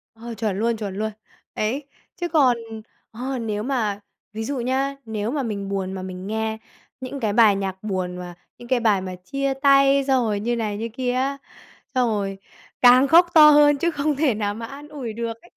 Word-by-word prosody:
Ờ, 235 +1 -8
chuẩn 210 -3 -2
luôn, 230 0 0
chuẩn 200 -3 -5
luôn. 220 +1 -2 0.4
Đấy, 265 +7 -2 0.3
chứ 350 - -3
còn 265 -7 +4 0.5
ờ, 255 +4 -4
nếu 215 -2 -3
mà 220 -6 -1 0.3
ví 220 +1 -4
dụ 275 +2 -3
nhá, 265 +3 -1
nếu 220 0 -3
mà 285 -2 -1
mình 200 -3 -4
buồn 190 -1 -3
mà 190 - -5
mình 185 0 -7
nghe 220 +1 -2 0.4
những 260 +2 -6
cái 215 -5 -1
bài 220 -3 +6
nhạc 190 0 -4
buồn 185 -3 -3
mà 180 -1 -7 0.2
những 240 - -12
cái 255 -1 +2
bài 210 -5 +2
mà 185 -1 -6
chia 275 +10 -3
tay, 275 0 +4
xong 260 -2 +3
rồi 210 -2 -1
như 240 +3 -1
này 215 -3 -2
như 230 +2 -4
kia 250 0 -1
á, 270 +2 -1 0.6
xong 250 -2 +2
rồi 195 -2 -2 0.4
càng 250 +2 +7
khóc 340 +4 +6
to 305 -2 +9
hơn 290 0 +6
chứ 340 +4 0
không 295 -1 -1
thể 285 -3 +2
nào 205 -1 -2
mà 230 +2 -6
an 280 +4 -10
ủi 265 -7 -6
được 230 +1 -3
ấy. - - -20
230 Hz, 210 wpm, -23 LUFS, 205-275 Hz, 0.6 s, to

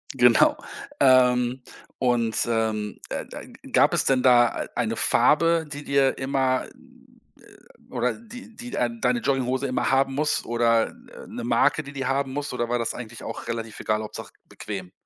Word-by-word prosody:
Genau, - - +5 0.4
ähm, 125 -1 +4 0.3
und, 120 -3 0
ähm, 110 -3 -1
äh, - - -4
äh, - - -9 0.2
gab - - +4
es - - +2
denn 130 -1 +3
da, 120 -2 +4
äh, - - -13
eine 115 -2 -1
Farbe, 165 +8 +3
die 145 0 -7
dir 140 -1 +1
immer 130 -1 0
äh, - - -22
oder 125 - -1
die 230 0 -12
die 245 0 -8
dein 235 -2 -2
deine 240 -1 +1
Jogginghose 130 0 0
immer 130 - -1
haben 135 0 +2
muss, 150 +2 0
oder, 115 -1 +2
äh, 245 0 -14
'ne 235 +1 -7
Marke, 195 -8 +2
die 140 0 -11
die 135 -2 -4
haben 135 0 -1
muss 145 -1 -4
oder 120 -1 -2
war 120 - +1
das 115 - -1
eigentlich 120 -1 -9
auch - - -7
relativ 115 -2 -5
egal, 110 0 -1
Hauptsache 105 - -8 0.2
bequem? 95 -4 -7
130 Hz, 170 wpm, -24 LUFS, 115-140 Hz, 0.4 s, Genau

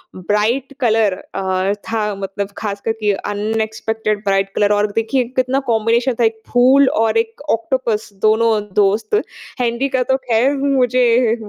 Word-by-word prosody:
Bright 215 +9 -1
colour 220 -5 +2
अ, 190 +1 -2
था 210 0 -3
मतलब 195 +1 -4
खासकर 205 +1 -3
कि 210 -1 +2
अनएक्सपेक्टेड 220 +1 -2
ब्राइट 195 0 +1
कलर 205 0 +2
और 205 +1 +2
देखिए, 225 +4 0
कितना 255 +1 +1
कॉम्बिनेशन 230 +3 +1
था 235 - +3
एक 220 0 0
फूल 260 +3 +5
और 225 0 +1
एक 225 +4 -2
ऑक्टोपस, 225 -2 -1
दोनों 220 +1 +3 0.3
दोस्त। 210 - +2 0.4
हेनरी 240 +3 0
का 260 -1 0
तो 265 +1 +1
ख़ैर 250 +3 +1
मुझे 250 -4 +2
225 Hz, 140 wpm, -18 LUFS, 210-245 Hz, 0.4 s, फूल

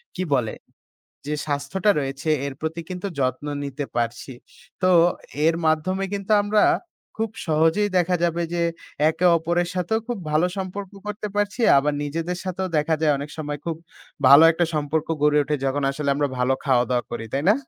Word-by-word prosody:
কী 185 - -2
বলে? 125 -5 +1 0.7
যে 150 - -1
স্বাস্থ্যটা 145 +8 0
রয়েছে 135 +2 -4 0.2
এর 140 - -5
প্রতি 160 +2 -3
কিন্তু 180 +1 -4
যত্ন 130 +1 -1 0.2
নিতে 140 +1 -4
পারছি। 120 +2 -2 0.5
তো 185 - +4 0.6
এর 165 - +4
মাধ্যমে 185 +5 +1
কিন্তু 200 +1 -2
আমরা 205 +1 +2 0.5
খুব 225 0 -1 0.2
সহজেই 165 +6 +2
দেখা 180 +1 +2
যাবে 170 0 0
যে 170 - 0 0.5
একে-অপরের 170 0 +2
সাথেও 185 +5 0
খুব 240 -3 -2
ভালো 155 +4 +3
সম্পর্ক 190 0 -5 0.2
করতে 210 0 -4
পারছি। 205 +4 -1 0.2
আবার 145 +2 +1
নিজেদের 165 +4 -3
সাথেও 185 0 -3
দেখা 155 +2 +1
যায় 155 -2 +3
অনেক 145 +2 -6
সময় 150 -1 -4
খুব 165 -2 -2 0.5
ভালো 140 +3 +9
একটা 175 +1 +1
সম্পর্ক 150 +1 -1 0.2
গড়ে 150 0 +4
ওঠে 150 +1 -1
যখন 140 +2 0
আসলে 140 +1 -4
আমরা 145 0 0
ভালো 125 +1 +2
খাওয়া-দাওয়া 125 -3 +2
করি। 115 - -5
তাই 140 +2 -1
না? - - +6
160 Hz, 165 wpm, -23 LUFS, 140-185 Hz, 0.7 s, ভালো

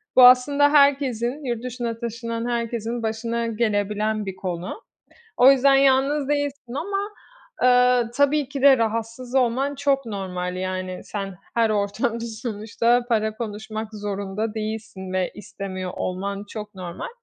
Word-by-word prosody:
bu 255 - +8
aslında 285 +3 +5
herkesin, 280 -2 +2
yurt 240 -2 -2
dışına 240 -2 -4
taşınan 235 0 -4
herkesin, 235 0 -2
başına 230 +1 -2
gelebilen 215 -1 0
bir 190 -1 -5
konu. 185 - -5 0.5
O 255 +2 +8
yüzden 275 0 +5
yalnız 275 +1 +3
değilsin 285 -4 -2
ama, 395 +7 -2 0.5
eee, 250 -1 +5
tabii 285 0 +2
ki 275 -1 -5
de 275 -2 +7
rahatsız 230 +3 -2
olman 265 +3 +1
çok 275 -1 +1
normal, 180 -4 -4
yani, 185 0 -4
sen 195 -2 -5 0.2
her 230 -1 +3
ortamda 215 +3 -1
sonuçta 230 +1 0
para 220 -1 +1
konuşmak 220 0 -5
zorunda 205 +1 -3
değilsin 215 -3 -5
ve 185 -1 0
istemiyor 185 -3 -6
olman 200 +2 -3
çok 210 -2 -7
normal. 175 -2 -6
230 Hz, 130 wpm, -23 LUFS, 205-255 Hz, 0.5 s, bu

